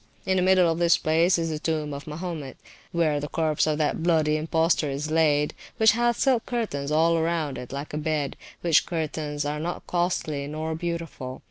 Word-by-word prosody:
In 190 Hz, -1 st, +1 dB
the -, -, +3 dB
middle 185 Hz, -1 st, +5 dB
of 165 Hz, 0 st, 0 dB
this 170 Hz, 0 st, +4 dB
place 165 Hz, +3 st, +3 dB
is 165 Hz, -1 st, -1 dB
the 155 Hz, -, -3 dB
tomb 155 Hz, -2 st, -2 dB
of 140 Hz, +1 st, -7 dB
Mahomet, 155 Hz, -3 st, -5 dB, 0.3 s
where 160 Hz, -4 st, +1 dB
the 145 Hz, -, -4 dB
corpse 155 Hz, -1 st, 0 dB
of 155 Hz, -1 st, +1 dB
that 155 Hz, +1 st, 0 dB
bloody 160 Hz, -3 st, +2 dB
impostor 160 Hz, 0 st, +1 dB
is 145 Hz, +3 st, -3 dB
laid, 150 Hz, -2 st, +2 dB, 0.2 s
which 220 Hz, -2 st, +6 dB
hath 240 Hz, +1 st, +1 dB
silk 255 Hz, -4 st, +2 dB
curtains 180 Hz, -, -2 dB
all 165 Hz, +2 st, +3 dB
around 160 Hz, -4 st, -1 dB
it 125 Hz, -, -9 dB
like 140 Hz, +2 st, -6 dB
a 150 Hz, -, -2 dB
bed; 150 Hz, -3 st, -1 dB, 0.3 s
which 170 Hz, -3 st, +3 dB
curtains 155 Hz, -3 st, -3 dB
are 150 Hz, +1 st, -2 dB
not 170 Hz, +3 st, -4 dB
costly 165 Hz, -5 st, -1 dB
nor 155 Hz, +2 st, -3 dB
beautiful. 165 Hz, -6 st, -5 dB
160 Hz, 195 wpm, -25 LUFS, 150-170 Hz, 0.3 s, which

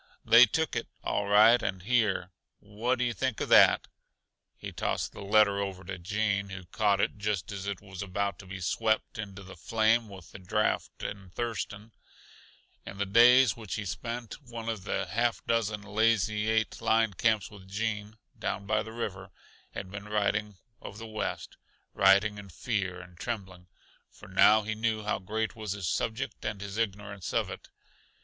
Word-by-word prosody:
They 115 Hz, +2 st, +8 dB
took 160 Hz, 0 st, -1 dB
it, -, -, -2 dB, 0.2 s
all 100 Hz, 0 st, -1 dB
right, 110 Hz, +4 st, +6 dB
and 95 Hz, -2 st, -3 dB
here, 105 Hz, -5 st, +1 dB, 0.3 s
what 110 Hz, +5 st, -2 dB
do 125 Hz, -, +1 dB
you 120 Hz, -, 0 dB
think 130 Hz, -1 st, -2 dB
of -, -, -3 dB
that?" -, -, +6 dB, 0.7 s
He -, -, -7 dB
tossed -, -, -2 dB
the -, -, -10 dB
letter 100 Hz, 0 st, +4 dB
over 95 Hz, -2 st, -4 dB
to 95 Hz, 0 st, -6 dB
Gene, 100 Hz, +1 st, -1 dB
who 95 Hz, -1 st, -7 dB
caught 105 Hz, +1 st, +1 dB
it 105 Hz, -, 0 dB
just 105 Hz, -3 st, -2 dB
as 100 Hz, -1 st, -5 dB
it 100 Hz, -2 st, -4 dB
was 95 Hz, -3 st, -9 dB
about 100 Hz, +1 st, -2 dB
to 95 Hz, -, -12 dB
be 95 Hz, 0 st, -7 dB
swept 110 Hz, +4 st, 0 dB
into 100 Hz, -2 st, -6 dB
the 95 Hz, -, -11 dB
flame 110 Hz, +4 st, +1 dB
with 95 Hz, -4 st, -12 dB
the -, -, -10 dB
draught 105 Hz, +4 st, -1 dB
in 100 Hz, -2 st, -6 dB
Thurston, 110 Hz, 0 st, -4 dB, 0.9 s
in 100 Hz, -, -9 dB
the 100 Hz, -, 0 dB
days 120 Hz, +3 st, +6 dB
which 110 Hz, -4 st, -6 dB
he 105 Hz, -, -4 dB
spent 115 Hz, -, -5 dB
one 115 Hz, -3 st, -6 dB
of 105 Hz, -4 st, -4 dB
the 100 Hz, -2 st, -1 dB
half 115 Hz, +6 st, -1 dB
dozen 110 Hz, -2 st, 0 dB
Lazy 105 Hz, 0 st, +1 dB
Eight 110 Hz, -1 st, 0 dB
line 115 Hz, -2 st, +2 dB
camps 110 Hz, 0 st, +1 dB
with 95 Hz, -2 st, -13 dB
Gene, 105 Hz, +1 st, -3 dB, 0.2 s
down 100 Hz, -, -3 dB
by 105 Hz, +2 st, +1 dB
the 110 Hz, -, -8 dB
river, 100 Hz, -5 st, -5 dB, 0.5 s
had 95 Hz, -, -6 dB
been 100 Hz, +1 st, -7 dB
writing 105 Hz, -1 st, 0 dB, 0.2 s
of 100 Hz, -, -9 dB
the 115 Hz, -, -7 dB
West 110 Hz, -1 st, -4 dB, 0.4 s
writing 100 Hz, +2 st, +4 dB
in 100 Hz, -1 st, -11 dB
fear 95 Hz, -, -2 dB
and 90 Hz, -2 st, -14 dB
trembling, 95 Hz, -6 st, -5 dB, 0.4 s
for 105 Hz, -, -15 dB
now 105 Hz, +3 st, +5 dB
he 110 Hz, +1 st, -2 dB
knew 110 Hz, 0 st, -1 dB
how 105 Hz, -, -1 dB
great 110 Hz, +4 st, -3 dB
was 110 Hz, -3 st, -4 dB
his 100 Hz, -4 st, -4 dB
subject 115 Hz, +9 st, -2 dB
and 105 Hz, -2 st, -3 dB
his 100 Hz, +1 st, -6 dB
ignorance 100 Hz, -3 st, -3 dB
of -, -, +1 dB
it. -, -, -9 dB
105 Hz, 180 wpm, -29 LUFS, 95-110 Hz, 0.9 s, They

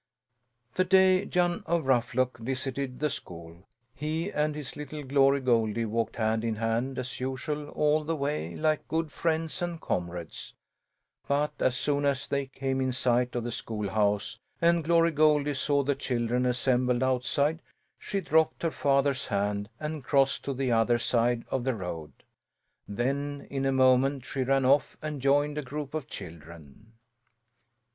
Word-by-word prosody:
The 185 Hz, -, +2 dB
day 190 Hz, +1 st, +4 dB
Jan 175 Hz, -2 st, +1 dB
of 170 Hz, -2 st, +1 dB
Ruffluck 125 Hz, -1 st, +1 dB
visited 130 Hz, +1 st, -3 dB
the 150 Hz, -, +2 dB
school, 85 Hz, +1 st, -9 dB, 0.3 s
he 160 Hz, +6 st, -3 dB
and 150 Hz, 0 st, 0 dB
his 150 Hz, -3 st, -7 dB
little 150 Hz, 0 st, -6 dB
Glory 135 Hz, 0 st, +3 dB
Goldie 115 Hz, -2 st, +1 dB
walked 115 Hz, +1 st, -2 dB
hand 110 Hz, 0 st, 0 dB
in 115 Hz, -1 st, -1 dB
hand, 115 Hz, +4 st, -1 dB
as 125 Hz, -1 st, -5 dB
usual, 135 Hz, +3 st, -3 dB
all 150 Hz, +1 st, +2 dB
the 165 Hz, +2 st, -1 dB
way, 140 Hz, -, -2 dB
like 155 Hz, -1 st, 0 dB
good 160 Hz, -1 st, -1 dB
friends 160 Hz, +3 st, -1 dB
and 175 Hz, -1 st, -3 dB
comrades; 85 Hz, -, -4 dB, 0.7 s
but 145 Hz, +2 st, +1 dB
as 125 Hz, -1 st, +1 dB
soon 145 Hz, +1 st, 0 dB
as 140 Hz, -2 st, +1 dB
they 140 Hz, -1 st, -1 dB
came 135 Hz, 0 st, -2 dB
in 130 Hz, 0 st, +1 dB
sight 125 Hz, 0 st, +1 dB
of 120 Hz, -, -1 dB
the 120 Hz, -, -3 dB
schoolhouse 105 Hz, -1 st, -1 dB, 0.2 s
and 170 Hz, 0 st, +3 dB
Glory 165 Hz, +1 st, +4 dB
Goldie 150 Hz, -1 st, +3 dB
saw 140 Hz, +1 st, +1 dB
the 140 Hz, +1 st, +1 dB
children 125 Hz, -1 st, -1 dB
assembled 125 Hz, 0 st, +1 dB
outside, 140 Hz, +5 st, +1 dB, 0.4 s
she 200 Hz, -1 st, -3 dB
dropped 160 Hz, -1 st, +2 dB
her 165 Hz, -, +1 dB
father's 140 Hz, -2 st, +1 dB
hand 100 Hz, 0 st, -1 dB
and 155 Hz, -2 st, -4 dB
crossed 135 Hz, +1 st, +2 dB
to 140 Hz, -, -2 dB
the 130 Hz, -1 st, 0 dB
other 115 Hz, +1 st, +3 dB
side 120 Hz, 0 st, +1 dB
of 130 Hz, -2 st, 0 dB
the 130 Hz, -1 st, 0 dB
road. 85 Hz, -6 st, -6 dB, 0.8 s
Then, 140 Hz, +6 st, -2 dB
in 135 Hz, -1 st, -1 dB
a -, -, +2 dB
moment, 130 Hz, 0 st, +3 dB
she 135 Hz, +1 st, -3 dB
ran 135 Hz, +1 st, +2 dB
off 140 Hz, +2 st, +3 dB
and 150 Hz, -3 st, -5 dB
joined 145 Hz, +2 st, +2 dB
a -, -, -2 dB
group 145 Hz, +1 st, -6 dB
of 155 Hz, -6 st, -3 dB
children. 85 Hz, +5 st, -11 dB
135 Hz, 160 wpm, -28 LUFS, 120-150 Hz, 0.8 s, day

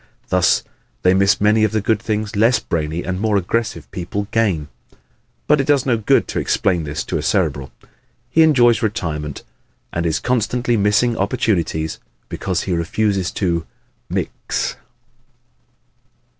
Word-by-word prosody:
Thus -, -, +3 dB, 0.4 s
they 90 Hz, -, +5 dB
miss 100 Hz, +2 st, +3 dB
many 105 Hz, +1 st, +3 dB
of 110 Hz, 0 st, +1 dB
the 110 Hz, -, +2 dB
good 110 Hz, 0 st, 0 dB
things 110 Hz, -1 st, -2 dB
less 115 Hz, +4 st, +4 dB
brainy 80 Hz, +1 st, -3 dB
and 90 Hz, 0 st, -3 dB
more 105 Hz, -2 st, +2 dB
aggressive 105 Hz, +4 st, -2 dB
people 100 Hz, +3 st, -4 dB
gain. 100 Hz, -10 st, +1 dB, 0.8 s
But 150 Hz, -1 st, +4 dB
it 135 Hz, -, -4 dB
does 145 Hz, -3 st, +3 dB
no 125 Hz, -3 st, +2 dB
good 110 Hz, -2 st, +2 dB
to -, -, -1 dB
explain 90 Hz, -5 st, 0 dB
this 75 Hz, +1 st, -3 dB
to -, -, -2 dB
a -, -, -3 dB
Cerebral. 70 Hz, -2 st, 0 dB, 0.6 s
He 160 Hz, -, +4 dB
enjoys 125 Hz, -7 st, +5 dB
retirement 80 Hz, -, -3 dB, 0.5 s
and 85 Hz, 0 st, -1 dB
is 80 Hz, -, 0 dB
constantly 120 Hz, 0 st, 0 dB
missing 105 Hz, +3 st, +2 dB
opportunities 85 Hz, -5 st, -1 dB, 0.3 s
because 90 Hz, -2 st, -2 dB
he 95 Hz, -, -2 dB
refuses 95 Hz, +2 st, 0 dB
to 85 Hz, -4 st, -1 dB, 0.4 s
"mix." -, -, -3 dB
100 Hz, 145 wpm, -19 LUFS, 85-115 Hz, 0.8 s, they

